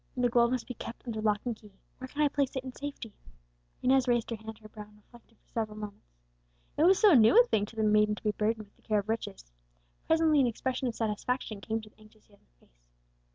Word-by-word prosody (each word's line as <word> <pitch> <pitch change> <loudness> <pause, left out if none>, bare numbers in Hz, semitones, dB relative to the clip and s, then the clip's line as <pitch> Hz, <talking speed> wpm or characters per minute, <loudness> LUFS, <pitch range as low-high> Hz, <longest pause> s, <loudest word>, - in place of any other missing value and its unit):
The 245 -1 +2
gold 235 0 +4
must 255 -1 -2
be 250 - -6
kept 230 +1 -9
under 220 -3 -4
lock 210 -1 +1
and 240 -2 -2
key, 210 -2 -18 0.3
where 260 - -6
can 295 +3 -1
I - - +5
place 280 -1 -1
it 260 - -3
in 260 -1 -7
safety?" 275 -7 -7 0.7
Inez 260 0 +3
raised 240 -1 +1
her - - -1
hand 220 0 -9
to 215 - -23
her - - -10
brow, 210 0 -9
and 210 - -21
reflected 230 +1 -21
for - - -39
several 215 -2 -3
moments. 205 - -10 0.6
It 310 - +3
was 380 +2 +6
so 420 -4 +6
new 240 - +7
a 485 - +7
thing 210 - 0
to 225 - -14
the 220 - -1
maiden 210 0 +3
to - - -13
be 210 - +2
burdened 215 +1 -1
with 200 - -30
the - - -28
care 215 - 0
of 205 +1 -2
riches! 65 - -4 0.6
Presently 320 -2 +4
an 255 - +3
expression 255 +3 -2
of 235 - -3
satisfaction 220 0 -2
came 225 +2 -3
to 215 - -13
the - - -31
anxious 215 0 -21
young 200 -1 -26
face. - - -30
225 Hz, 250 wpm, -30 LUFS, 210-255 Hz, 0.7 s, new